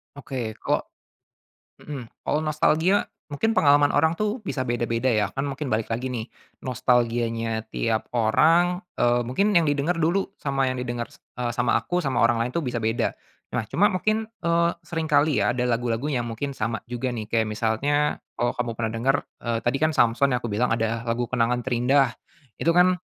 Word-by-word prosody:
Oke. 125 -6 -5
Kalau - - +1 1.0
mhm, 140 -4 -7 0.2
kalo 150 - +1
nostalgia 155 +5 +2 0.2
mungkin 225 +11 0
pengalaman 145 -4 +4
orang 160 +3 +2
tuh 215 +3 -1
bisa 130 -8 -2
beda-beda 120 0 0
ya. 110 -4 +2
Kan 135 +1 -2
mungkin 140 0 -4
balik 110 0 0
lagi 120 +3 -2
nih, 115 -3 -4 0.4
nostalgianya 115 -3 0
tiap 110 -1 -1
orang, 165 - +3 0.2
eee, 120 0 +3
mungkin 200 - +1
yang 170 -2 +5
didenger 145 +3 +1
dulu 170 +4 0
sama 135 -2 0
yang 130 - -2
didenger, 120 -1 -3
s - - -21 0.2
eee, 120 -1 -1
sama 120 - +2
aku, 180 0 -2
sama 135 -5 -1
orang 115 0 +3
lain 120 - -2
tuh 170 - 0
bisa 120 -2 -2
beda. 115 +1 0 0.4
Nah, - - +1
cuma 205 - +4
mungkin, 215 +4 0 0.2
eee, 170 0 +3
seringkali 155 -3 +1
ya, 120 - +1
ada 125 - -1
lagu-lagu 120 +1 -1
yang 120 -4 -1
mungkin 115 +5 -4
sama 110 -4 -3
juga 125 +1 -2
nih, 110 -2 -6
kayak 115 -1 +2
misalnya 115 +8 0 0.2
kalau 120 +1 0
kamu 120 -1 -2
pernah 110 -1 -2
denger, 135 +4 +3 0.3
eee, 115 -1 0
tadi 120 +4 +1
kan, 155 +2 +2
Samson 125 +1 +3
ya, - - +3
aku 120 - -3
bilang, 115 +5 +1
ada 115 +1 -2
lagu 120 0 -1
Kenangan 120 0 +1
Terindah. 130 +3 +2 0.5
Itu 165 +1 +2
kan 180 +1 +5
125 Hz, 180 wpm, -24 LUFS, 115-150 Hz, 1.0 s, yang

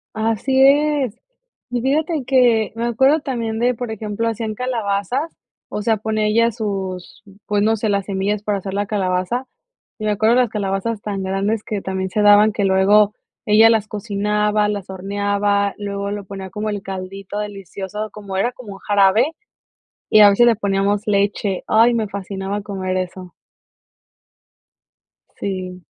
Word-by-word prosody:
¡Así 225 +5 +1
es! 280 -4 +3 0.5
Y 245 -1 -1
fíjate 300 +2 0
que 245 -4 +3
me 230 +1 -2
acuerdo 265 +6 +3
también 230 -5 -3
de, 245 +2 +2
por 240 0 -5
ejemplo, 220 +1 -3
hacían 225 -1 -2
calabazas, 245 - -2 0.4
o 210 - -4
sea, 220 0 +1
pone 215 0 -1
ella 230 +2 +3
sus, 195 -4 -5 0.2
pues, 205 -1 +1
no 220 +1 +3
sé, 220 0 -2
las 200 -1 0
semillas 200 +1 -2
para 205 -2 -1
hacer 190 0 -6
la 205 0 0
calabaza. 195 +4 -1 0.5
Y 215 - -5
me 210 - +1
acuerdo 220 +3 +3
las 250 -3 +3
calabazas 205 +1 -2
tan 200 -2 -4
grandes 200 +3 -1
que 210 -4 -4
también 190 -1 -3
se 210 - 0
daban 210 +1 +6
que 205 - -1
luego 200 +2 +4 0.3
ella 220 +2 +6
las 215 -2 +1
cocinaba, 210 0 0
las 200 -2 -4
horneaba, 200 +1 0
luego 200 0 -4
lo 205 -1 -5
ponía 190 -1 -8
como 215 0 -3
el 205 -2 -4
caldito 195 +1 -6
delicioso, 205 +1 -6
como 200 -2 -7
era 235 +5 +1
como 240 -5 -10
un 195 - -12
jarabe 205 +7 +3 0.8
y 215 - +6
a 205 -1 +9
veces 240 +4 +4
le 230 - +3
poníamos 200 0 0
leche. 200 -1 0
Ay, 230 +2 +5
me 220 -3 -1
fascinaba 195 +1 -4
comer 190 -2 -3
eso. 185 -1 -5 2.1
Sí. 185 -2 -5
210 Hz, 160 wpm, -20 LUFS, 195-225 Hz, 2.1 s, a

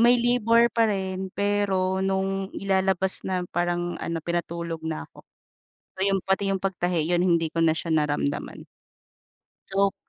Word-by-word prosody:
may 240 +1 +6
labor 235 -1 +3
pa 225 0 +3
rin, 190 -2 -2
pero 195 -2 +1
nung 195 0 -1
ilalabas 190 -1 +1
na, 185 -1 -1
parang 175 0 -1
ano 170 - -3
pinatulog 170 -1 -3
na 160 - -4
ako. - - -17 0.8
Yung 195 0 +2
pati 195 +1 +1
yung 195 - 0
pagtahi, 175 -4 0
yun 175 - +2
hindi 170 -2 +2
ko 165 +1 -1
na 165 - +5
siya 165 +1 -3
naramdaman. 145 -2 -1 1.0
So, 195 0 +2
190 Hz, 145 wpm, -25 LUFS, 170-195 Hz, 1.0 s, may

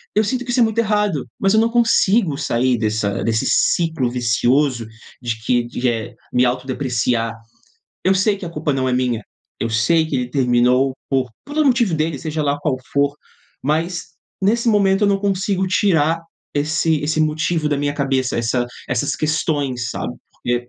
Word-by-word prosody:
eu 215 - +4
sinto 250 +4 -1
que 245 - -3
isso 245 - +1
é - - +7
muito 220 0 0
errado, 210 - +1
mas 195 +1 +2
eu 220 - +5
não 225 +1 +3
consigo 225 -8 +3
sair 130 -3 +1
dessa 110 -2 -1
desse 110 -1 0
ciclo 160 -7 +2
vicioso 125 +1 +1 0.4
de 115 -3 -3
que 120 0 +2
de, 125 +1 -2
eh, 115 -3 -3 0.2
me 125 0 +4
autodepreciar. 125 -2 -1 0.7
Eu 190 - +4
sei 200 +2 +2
que 195 - -7
a - - -6
culpa 150 -2 -1
não 130 -1 0
é 125 - 0
minha, 125 -3 0 0.4
eu 115 - 0
sei 140 +9 +2
que - - -4
ele 125 -1 -2
terminou 125 0 +2 0.2
por 130 -3 +1
pelo 300 +2 0
motivo 235 - +3
dele, 155 -2 -1
seja 155 +1 -3
lá 145 0 0
qual 145 -4 0 0.2
for, 140 0 +2 0.5
mas, 165 +5 -1 0.3
nesse 230 +4 +2
momento, 200 -2 +3
eu - - +4
não 200 -1 +2
consigo 195 -1 0
tirar 165 -4 +2 0.3
esse 155 +1 +1
esse 155 +1 0
motivo 155 0 0
da 145 - +1
minha 145 0 -1
cabeça. 135 -3 0
Essa 120 +1 0 0.2
essas 125 -3 0
questões, 145 -6 -1
sabe, - - -4 0.2
porque 120 0 -3
145 Hz, 175 wpm, -20 LUFS, 125-190 Hz, 0.7 s, é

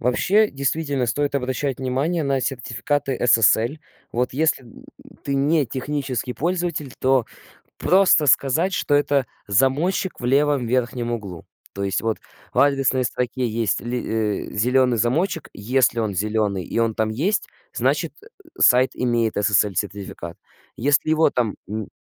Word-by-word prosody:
Вообще, 200 - +2
действительно 140 -1 -1
стоит 145 +4 -1
обращать 130 0 -2
внимание 140 +6 -1
на 135 -2 0
сертификаты 135 +2 -2
SSL. 115 +3 +3 0.3
Вот 125 +1 -1
если, 150 -2 +1
м, 115 - -15 0.4
ты 140 -1 -1
не 145 +1 +2
технический 130 -1 -3
пользователь, 170 -4 -2
то 130 -3 +2 0.5
просто 185 -4 +4
сказать, 160 +9 +2
что- 145 - +1
это 145 -2 +2 0.2
замочек 140 - +1
в - - -5
левом 140 -1 +2
верхнем 120 -1 -1
углу. 100 -8 -6 0.3
То 100 - -4
есть 95 -2 -1
вот 115 -1 -1 0.3
в - - +1
адресной 135 -2 +3
строке 125 +1 -2
есть 110 -1 -1
ли 120 +1 -3 0.5
э, - - -10
зеленый 125 +2 +2
замочек, 150 - 0
если 120 +3 +1
он 110 -3 -1
зеленый 105 -1 -1
и 115 - -3
он 115 -1 +1
там 110 -1 0
есть, 170 - -1 0.3
значит, - - 0
э, - - -14 0.3
сайт 125 +1 +5
имеет 120 -3 0
SSL-сертификат. 100 -1 -1 0.4
Если 145 +5 +2
его 160 -1 +4
там 120 -4 -1
н 110 0 -5
130 Hz, 140 wpm, -22 LUFS, 115-145 Hz, 0.5 s, сайт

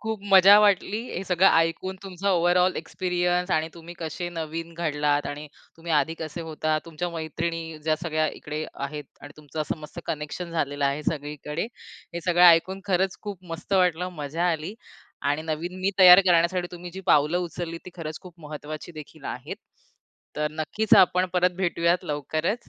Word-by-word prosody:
खूप 220 -2 -4
मजा 195 +1 +9
वाटली. 205 +1 +2
हे 185 - -3
सगळं 185 +1 +4
ऐकून 165 +3 -1
तुमचा 195 +1 -2
ओव्हरऑल 180 +1 +3
एक्सपिरियन्स 180 +1 -1
आणि 160 -1 +1
तुम्ही 170 +1 -11
कसे 170 +2 -4
नवीन 165 0 -5
घडलात 150 -3 0
आणि 150 +1 -6 0.3
तुम्ही 165 0 -5
आधी 150 +2 +2
कसे 160 +1 -5
होतात 155 -1 -1
तुमच्या 165 +1 -4
मैत्रिणी 165 0 -4
ज्या 155 -1 +3
सगळ्या 155 -2 0
इकडे 150 +1 -4 0.2
आहेत 150 +1 -7 0.2
आणि 145 - -11
तुमचं 155 0 -7
असं 155 - -2
मस्त 155 +3 -10
कनेक्शन 155 +3 -4
झालेलं 145 -3 -1
आहे 140 +2 0
सगळीकडे. 150 +3 -3 0.5
हे 170 - -3
सगळं 180 0 +4
ऐकून 175 +3 +4
खरंच 190 0 +1
खूप 200 -3 -7
मस्त 170 +4 -7
वाटलं 180 -2 +2
मजा 165 +5 0
आली 160 +6 -5 0.6
आणि 150 +2 -1
नवीन 165 +3 -4
मी 195 +2 +1
तयार 180 0 +10
करण्यासाठी 175 +1 +3
तुम्ही 175 0 -8
जी 190 - -6
पावलं 150 +4 +4
उचलली 165 -1 -5
ती 180 - -9
खरंच 155 -2 -6
खूप 180 -3 -12
महत्वाची 155 +2 -7
देखील 155 -3 -12
आहेत. - - -6 0.8
तर 150 0 0
नक्कीच 160 +8 +1
आपण 180 +1 0
परत 180 0 +3
भेटूयात 170 0 +1
लवकरच. 155 - -2
170 Hz, 165 wpm, -25 LUFS, 155-180 Hz, 0.8 s, तयार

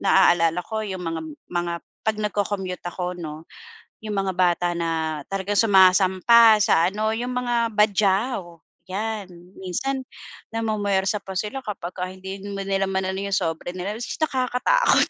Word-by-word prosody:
naaalala 175 -3 +4
ko 220 -1 -3
yung 185 -2 -5
mga 165 0 -3 0.3
mga 175 0 -1 0.3
'pag 220 -1 +2
nagco-commute 200 -3 -2
ako 180 0 -4
'no, 155 -1 -7 0.6
yung 210 -1 -3
mga 195 -1 0
bata 175 -1 +2
na 160 -2 -1
talagang 195 +1 -2
sumasampa 195 +3 +6
sa 165 -2 +4
ano, 215 +3 -1
yung 245 +2 -3
mga 240 -2 +1
Badjao, 200 -3 +1 0.2
yan. 210 +1 -3 0.3
Minsan 260 +9 -2 0.5
namumwersa 205 -3 0
pa 190 - -7
sila 210 +8 -2
kapagka 180 -3 -4
hindi 190 +1 -8
mo 200 -1 -4
nilamanan 190 -1 -1
na 200 - -3
yung - - +3
sobre 165 0 -2
nila 190 +3 -3
tapos 240 - -4
nakakatakot 265 - +2
195 Hz, 140 wpm, -23 LUFS, 180-215 Hz, 0.6 s, sumasampa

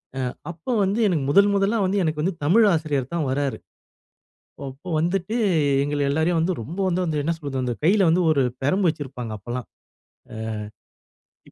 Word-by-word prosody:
ஆ. - - -4 0.3
அப்போ 170 +8 -6
வந்து 195 +4 0
எனக்கு 165 -7 0
முதல் 200 +7 +5
முதலா 200 +3 +2
வந்து 195 +2 0
எனக்கு 155 -2 -1
வந்து 185 +5 0
தமிழ் 205 +10 +5
ஆசிரியர் 150 -5 -1
தான் 165 -4 -1
வராரு. 140 0 -1 1.1
அப்போ 135 +7 -11
வந்துட்டு 180 +5 -1 0.5
எங்கள 145 +1 -2
எல்லோரையும் 160 +4 +1
வந்து 170 +3 +1
ரொம்ப 155 - -8
வந்து 170 -5 0
என்ன 165 +3 0
சொல்வது 140 -4 -4
அந்த 125 - -1
கையில 190 +3 +4
வந்து 170 +3 +3
ஒரு 140 -3 +2 0.2
பிரம்பு 185 +8 +2
வச்சிருப்பாங்க, 135 -7 -5
அப்போலாம். 120 +4 -6 1.8
அ. - - -26
160 Hz, 155 wpm, -23 LUFS, 140-185 Hz, 1.8 s, முதல்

